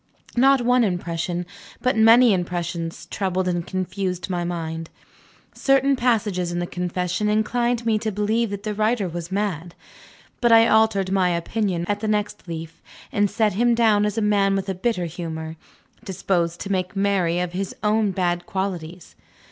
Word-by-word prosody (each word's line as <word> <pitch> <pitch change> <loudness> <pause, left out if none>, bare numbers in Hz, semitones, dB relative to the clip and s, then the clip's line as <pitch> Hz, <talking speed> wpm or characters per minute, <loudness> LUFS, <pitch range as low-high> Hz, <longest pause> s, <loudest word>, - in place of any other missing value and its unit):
Not 265 +1 +5
one 245 0 +3
impression, 175 -2 -2 0.3
but 255 - +1
many 225 +1 +6
impressions, 175 -2 -3
troubled 185 -2 -2
and 175 -1 -1
confused 185 0 -3
my 175 -1 -1
mind. 165 -2 -4 0.6
Certain 275 0 +3
passages 210 -8 0
in 175 - -3
the 175 - -1
confession 180 +3 -2
inclined 235 +2 0
me 220 -2 +2
to 220 0 -2
believe 215 +3 0
that 200 0 -6
the 215 - -2
writer 215 -1 +1
was 170 +1 -6
mad. 180 -4 -2 0.7
But 240 -1 +3
I 225 0 +7
altered 215 -4 +3
my 190 -2 +2
opinion 175 +1 -1
at 205 0 -1
the 215 - -3
next 210 -2 -2
leaf, 165 -1 -7 0.3
and 205 -1 +2
set 215 -1 +1
him 240 +4 +2
down 215 -3 +3
as 210 - -4
a 220 - +1
man 200 -1 +2
with 195 0 -2
a - - 0
bitter 185 -1 -1
humor, 160 -1 -6 0.5
disposed 175 -4 -1
to 200 - -4
make 185 0 -1
merry 195 -4 +1
over 180 0 -3
his 195 0 -3
own 215 0 +2
bad 175 -2 -1
qualities. 180 -3 -5
195 Hz, 165 wpm, -23 LUFS, 175-215 Hz, 0.7 s, I